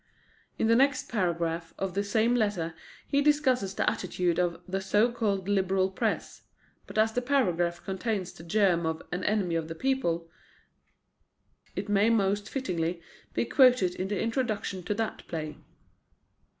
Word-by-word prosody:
In - - +1
the 230 +1 +5
next 265 +1 +2
paragraph 170 -5 -1
of 195 -2 -3
the 200 +2 0
same 220 +3 +2
letter 205 -8 0 0.3
he 280 - +2
discusses 260 -9 +2
the - - 0
attitude 180 -2 0
of 175 -2 0
"the 190 +1 -2
so 210 +5 +3
called 200 -5 -1
Liberal 190 -1 +2
press"; - - -2 0.5
but - - -8
as 220 +1 +3
the 245 - 0
paragraph 175 -11 +1
contains 195 -1 -2
the - - -12
germ 170 -2 +2
of 160 0 -3
An 180 +1 -3
Enemy 205 -5 +1
of 165 -1 -1
the 165 - -6
People, 170 -9 0 1.5
it - - -3
may 205 +2 +3
most 205 -1 +1
fittingly 175 -10 -2 0.4
be - - +1
quoted 250 -9 +5
in 185 - -3
the 205 -1 -2
introduction 225 -5 -1
to 210 - -1
that 225 0 -3
play. 155 -2 -5
195 Hz, 155 wpm, -28 LUFS, 175-225 Hz, 1.5 s, the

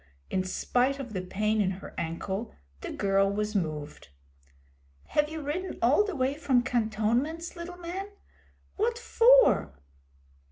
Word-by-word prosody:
In 185 - +1
spite 250 +8 0
of 255 -5 -7
the 185 - -2
pain 210 +4 0
in 190 - +2
her 190 - -10
ankle 190 +6 -4 0.2
the - - -6
girl 195 -1 +2
was 210 +1 -2
moved. 155 -6 -3 1.0
'Have 295 0 +2
you 315 -1 -6
ridden 355 +6 -3
all 265 - +4
the 405 -4 -4
way 260 0 +1
from 280 -5 +2
cantonments, 245 +7 0
little 350 +1 -7
man? 360 +3 -5 0.7
What 460 +3 +1
for?' 475 - +5
245 Hz, 135 wpm, -28 LUFS, 195-330 Hz, 1.0 s, for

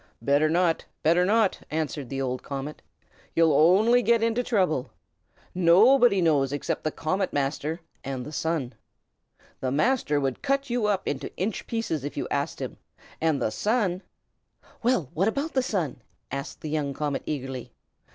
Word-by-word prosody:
"Better 145 +2 +2
not! 170 0 +1 0.2
better 170 +3 +4
not!" 215 0 +2
answered 150 -4 -3
the 135 - -3
old 130 -1 -2
comet. 140 +2 -6 0.5
"You'll 165 -2 +4
only 195 +11 +5
get 230 -1 +3
into 230 +1 +1
trouble. 185 - 0 0.6
Nobody 200 +5 +5
knows 140 -5 +3
except 145 - -2
the 155 - +1
Comet 185 +5 -1
Master 145 +4 -2 0.2
and 130 -2 -4
the 150 - -7
Sun. 155 -5 -2 0.9
The 130 - -1
Master 150 - +1
would 135 -2 -2
cut 275 -1 0
you 240 -3 +1
up 200 -3 0
into 140 0 -3
inch 200 +3 -2
pieces 225 - -2
if 145 - -5
you - - -2
asked - - -1
him, - - -5 0.4
and 160 -3 +2
the 110 - 0
Sun 205 - 0 0.4
" - - -30
"Well, 235 - +1
what 190 +6 +1
about 280 +8 -1
the 260 - +3
Sun?" 175 - -2 0.3
asked 140 0 -5
the 155 - -5
young 145 -3 -1
comet, 145 -1 -2
eagerly. 135 -4 -4
160 Hz, 160 wpm, -26 LUFS, 140-215 Hz, 0.9 s, only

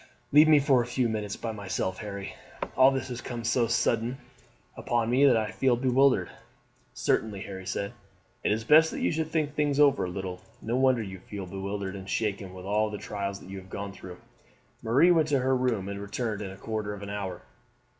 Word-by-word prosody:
"Leave 150 +2 +7
me 155 -1 +7
a 135 -3 +4
few 120 +1 0
minutes 105 -2 -3
by 115 - -4
myself, 95 -3 -3
Harry. 100 -2 -6 0.4
All 130 +1 +7
this 130 -1 -2
has 120 -1 -5
come 120 -2 -6
so 120 0 +2
suddenly 115 +1 +1 0.6
upon 120 -1 0
me 135 +3 +5
that 125 -4 +5
I 110 -1 -1
feel 130 -2 +2
bewildered." 130 -5 +3 0.6
"Certainly," 105 -3 -1
Harry 95 -2 -7
said. 100 +2 -3 0.5
"It - - +2
is 110 +1 0
best 155 +6 +6
that - - -5
you - - +2
should 160 -1 -2
think 155 -3 -1
things 145 -1 0
over 140 -7 +5
a - - -4
little. 90 -1 -5 0.2
No 115 +2 -2
wonder 130 -3 +3
you 95 -2 -8
feel 100 +1 -7
bewildered 100 +1 -4
and 95 0 -8
shaken 100 -4 -2
with 90 0 -9
all 105 +2 +1
the 105 - -5
trials 100 -1 -5
you 95 +1 -7
have 95 0 -15
gone 100 0 -5
through." 90 -2 -10 0.6
Marie 135 +11 +4
went 160 -3 +4
to 145 -2 +2
her 130 0 +2
room 120 -7 0
and 100 0 -5
returned 105 +1 -3
in 100 - -4
a 95 - -10
quarter 105 -1 -4
of 100 - -10
an 100 - -6
hour. 95 -3 -5
110 Hz, 205 wpm, -28 LUFS, 100-130 Hz, 0.6 s, Leave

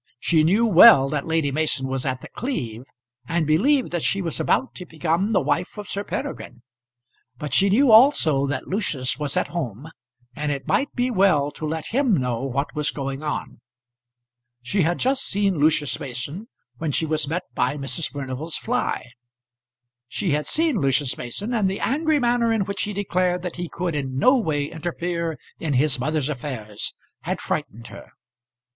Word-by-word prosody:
She 160 +2 +3
knew 200 +9 +3
well 185 -8 +8
that 145 0 -2
Lady 160 -3 +1
Mason 150 -2 0
was 130 0 -2
at 130 -1 -2
The - - -9
Cleeve, 125 - -4 0.4
and 165 -1 0
believed 250 - +2
that 175 -1 -1
she 195 - +1
was 170 -5 -3
about 265 - +1
to 180 - -9
become 165 +5 0
the 220 - +3
wife 180 - -1
of 210 - -7
Sir 200 - -3
Peregrine; 120 - -6 0.7
but 145 0 -5
she 195 +9 +4
knew 245 +5 +4
also 215 - +5
that 140 -1 -3
Lucius 155 - -1
was 145 +2 -2
at 180 - 0
home, 150 - -5 0.4
and 150 0 -2
it 140 -2 -4
might 285 0 +1
be 250 0 0
well 185 -9 +3
to 155 - -5
let 160 0 -3
him 250 -4 +2
know 125 -3 -1
what 135 +1 -2
was 150 -1 0
going 135 -1 -4
on. 150 -1 -4 1.0
She 190 +10 0
had 170 +2 +1
just 265 +1 +1
seen 195 -4 0
Lucius 150 -1 +2
Mason 140 - -5 0.3
when 160 -2 -1
she 160 - 0
was 155 -2 -1
met 165 +5 -2
by 145 - 0
Mrs. 140 +3 -3
Furnival's 140 +3 -5
fly. 250 +2 -2 1.0
She 175 +6 -2
had 150 +1 0
seen 315 -8 +1
Lucius 135 -1 +1
Mason, 200 - -4
and 210 -5 +2
the 195 - -3
angry 310 +3 +1
manner 240 -2 +2
in 220 -4 +1
which 200 +1 -3
he 210 - -4
declared 180 -2 0
that 180 -2 -5
he 175 -1 -4
could 175 -1 -3
in 135 -3 -3
no 255 - +5
way 155 - 0
interfere 170 0 -3 0.2
in 155 -3 -2
his 135 0 +2
mother's 150 +1 0
affairs 120 -7 -4 0.2
had - - -3
frightened 115 +2 -4
her. - - -11
160 Hz, 180 wpm, -23 LUFS, 140-200 Hz, 1.0 s, well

